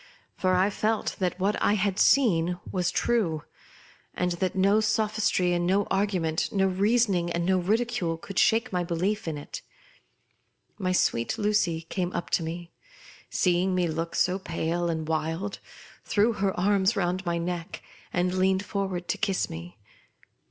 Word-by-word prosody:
For 185 -1 +1
I 190 +3 +3
felt 215 +1 -1
that 180 -1 -1
what 200 +3 0
I - - +3
had 200 -2 0
seen 180 -10 +3
was 180 -1 0
true, 180 -7 0 0.7
and 180 0 0
that 185 -1 0
no 195 +3 +4
sophistry 215 -4 +1
and 175 0 0
no 195 +2 +3
argument, 185 -5 0
no 195 -1 +2
reason 195 -2 +2
and 170 0 -1
no 185 0 +3
ridicule, 215 -3 0
could 190 +3 -4
shake 225 0 +3
my 180 -1 +1
belief 185 +5 -1
in 155 -2 -2
it. 145 - -8 1.2
My 185 -2 0
sweet 120 - +1
Lucy 205 -6 +1
came 175 +2 -3
up 175 - -4
to - - +2
me, 170 +1 -6 0.6
seeing 185 +1 +1
me 180 -1 +1
look 165 +1 -3
so 185 +1 +2
pale 170 -1 -2
and 160 -2 -2
wild, 160 +5 -2 0.4
threw 220 +3 +2
her 195 -3 -1
arms 200 +2 +2
round 185 -1 -1
my 170 -2 -1
neck, 170 0 -4 0.3
and 180 0 0
leaned 190 +1 +1
forward 190 -3 -3
to - - -1
kiss 195 -2 0
me. 85 +4 -8
185 Hz, 160 wpm, -27 LUFS, 170-200 Hz, 1.2 s, no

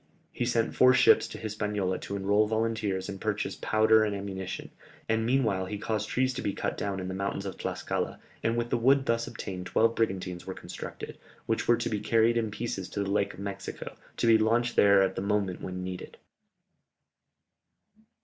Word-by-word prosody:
He 120 - -2
sent 115 -2 +1
four 130 0 +6
ships - - +6
to - - -8
Hispaniola 105 -3 -2
to 100 - -5
enrol 100 +2 +2
volunteers 110 -4 -1
and 95 -1 -7
purchase 105 -1 -1
powder 110 0 +4
and 105 -1 -1
ammunition, 95 -1 -5 0.4
and 115 0 +1
meanwhile 110 -8 +1
he 105 - -4
caused 110 +1 -2
trees 130 0 +1
to 130 - -4
be 100 - -1
cut - - -2
down 100 -1 -3
in 95 - -4
the 95 - -4
mountains 100 +1 -3
of 95 - -4
Tlascala, - - -3 0.2
and 115 +1 0
with 120 0 -2
the 120 - +2
wood 135 +3 +4
thus 115 -1 0
obtained 90 -2 -6
twelve 115 +5 +3
brigantines 95 -6 -2
were 95 - -4
constructed, - - -8 0.3
which 115 - -1
were 120 - +5
to 120 - -2
be 105 - -1
carried 115 +2 +3
in 115 -2 0
pieces 105 -3 -4
to 100 - -2
the 100 - -3
Lake 100 0 0
of - - -13
Mexico, 100 -1 -6 0.2
to - - 0
be 115 -1 +6
launched 120 +2 +2
there 100 -1 +6
at 95 - 0
the - - -4
moment 100 -2 -1
when 90 0 -5
needed. 90 0 -7
105 Hz, 195 wpm, -29 LUFS, 95-115 Hz, 0.4 s, four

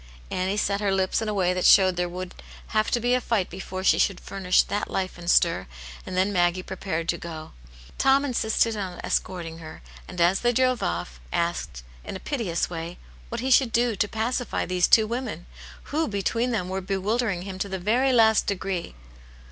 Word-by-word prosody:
Annie 190 +2 -1
set 200 -1 0
her 200 -1 +1
lips 190 +2 +1
in 220 - -2
a - - -1
way 180 -2 +2
that 180 0 -2
showed 185 -2 +6
there 175 0 -1
would 180 +1 -6 0.4
have 215 -1 +1
to 240 - +1
be 245 +1 +1
a 250 - +2
fight 220 -6 0
before 185 +1 -6
she - - +4
should 195 -3 +2
furnish 190 -2 +2
that 205 - -3
life 185 -1 -2
and 170 0 -5
stir, 170 - +3 0.4
and 185 - -4
then 190 +2 +2
Maggie 175 0 +2
prepared 180 -4 -4
to 170 - 0
Qo, 160 -2 -8 0.5
Tom 270 +1 +4
insisted 225 -3 +1
on 190 -4 -5
escorting 165 -3 -2
her, 155 -1 -10 0.2
and 180 - -8
as 175 +3 +4
they 240 0 +2
drove 255 0 +2
off, 85 -8 -3
asked, 85 - -2 0.2
in - - -6
a - - -5
piteous 210 - -2
way, 170 0 -6 0.3
what 235 0 -4
he 260 +1 -1
should 255 -2 +5
do 235 0 +2
to 205 - +1
pacify 230 +4 -2
these 180 -1 +2
two 220 - +6
women, 225 -7 -4 0.5
who, 315 +1 +1
between 230 +4 -1
them, 205 -7 -1
were 190 +1 -3
bewilder 205 +5 0
ing 180 -3 -3
him 190 -1 -7
to 200 - -2
the 190 - -3
very 235 +9 +2
last 220 -3 +4
degree. 190 - -3
190 Hz, 205 wpm, -25 LUFS, 180-225 Hz, 0.5 s, showed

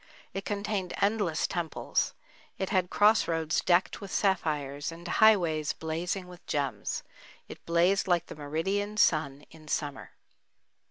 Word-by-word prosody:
It 195 - -4
contained 200 -2 -2
endless 200 -6 +1
temples. 175 -4 -1 0.4
It 190 - -3
had 185 -3 +2
cross 210 +2 +4
roads 165 -1 0
decked 180 +3 +2
with 200 - -8
sapphires, 150 -7 0
and 170 +2 -9
highways 175 -8 +4
blazing 175 +4 -3
with 180 -1 -13
gems. 140 -2 -2 0.4
It - - -11
blazed 175 +4 +3
like 175 -2 +2
the - - -9
meridian 190 +8 -2
sun 145 -7 +2
in 155 -1 -15
summer. 145 -2 -3
175 Hz, 130 wpm, -29 LUFS, 155-195 Hz, 0.4 s, cross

